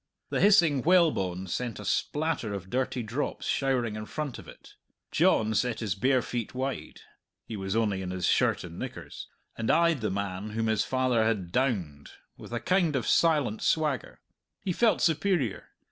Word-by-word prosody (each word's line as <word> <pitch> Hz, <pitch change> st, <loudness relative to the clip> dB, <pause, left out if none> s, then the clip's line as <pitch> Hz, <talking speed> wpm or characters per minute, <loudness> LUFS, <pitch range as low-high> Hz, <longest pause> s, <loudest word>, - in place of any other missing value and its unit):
The -, -, 0 dB
hissing 170 Hz, -9 st, +5 dB
whalebone 145 Hz, -, +2 dB
sent 115 Hz, +5 st, -3 dB
a 105 Hz, -, -8 dB
splatter 130 Hz, -, -1 dB
of 95 Hz, -1 st, -8 dB
dirty 130 Hz, -1 st, -1 dB
drops 115 Hz, +7 st, -3 dB
showering 125 Hz, -5 st, 0 dB
in 110 Hz, 0 st, -6 dB
front 150 Hz, -5 st, -4 dB
of -, -, -12 dB
it. -, -, -14 dB, 0.4 s
John 110 Hz, 0 st, +3 dB
set 120 Hz, +3 st, 0 dB
his 105 Hz, -5 st, -1 dB
bare 130 Hz, +5 st, +2 dB
feet 120 Hz, 0 st, -4 dB
wide 135 Hz, +1 st, -4 dB, 0.4 s
(he 110 Hz, -, -6 dB
was 95 Hz, 0 st, -3 dB
only 105 Hz, -4 st, +1 dB
in 90 Hz, -, -4 dB
his 90 Hz, -1 st, -2 dB
shirt -, -, +2 dB
and -, -, -9 dB
knickers) -, -, -7 dB, 0.3 s
and 110 Hz, -, -3 dB
eyed 170 Hz, -5 st, +3 dB
the 110 Hz, -, 0 dB
man 100 Hz, +1 st, -3 dB
whom 115 Hz, -, +1 dB
his 110 Hz, -2 st, +2 dB
father 130 Hz, -1 st, +1 dB
had 105 Hz, -6 st, -1 dB
"downed" 90 Hz, -, -1 dB, 0.3 s
with -, -, -12 dB
a 120 Hz, -, -2 dB
kind 175 Hz, -, +1 dB
of 130 Hz, -, -1 dB
silent 150 Hz, -10 st, +2 dB
swagger. 150 Hz, -5 st, 0 dB, 0.4 s
He 185 Hz, -, -2 dB
felt 225 Hz, +4 st, +2 dB
superior. 160 Hz, -, +1 dB
120 Hz, 175 wpm, -28 LUFS, 105-145 Hz, 0.4 s, hissing